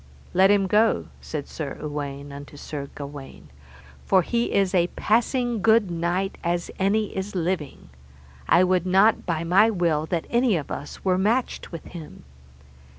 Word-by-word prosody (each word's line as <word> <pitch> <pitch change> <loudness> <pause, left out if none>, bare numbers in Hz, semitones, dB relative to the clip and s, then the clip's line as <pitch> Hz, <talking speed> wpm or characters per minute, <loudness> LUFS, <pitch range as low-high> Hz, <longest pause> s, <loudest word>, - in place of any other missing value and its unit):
Let 190 +2 +5
him 200 -1 +4
go, 215 +4 +2
said 150 -3 -5
Sir 145 -4 -6
Uwaine 145 -1 -5
unto 145 +1 -10
Sir 140 -1 -6
Gawaine, 140 - -9 0.5
for 190 -2 +3
he 235 +6 -1
is 195 -1 +1
a 175 -2 +3
passing 240 +1 +1
good 220 -3 +4
knight 175 +3 -2
as 170 0 -1
any 205 +2 +1
is 190 +1 -4
living; 170 -5 -3 0.6
I 180 - +6
would 185 -1 +1
not 195 +4 +3
by 165 -2 -1
my 190 +6 +5
will 170 -6 0
that 170 -2 -2
any 240 -5 +3
of 150 - -6
us 145 - -7
were 185 -1 +2
matched 230 +6 0
with 165 -3 -7
him. 165 - -10
180 Hz, 155 wpm, -24 LUFS, 155-205 Hz, 0.6 s, I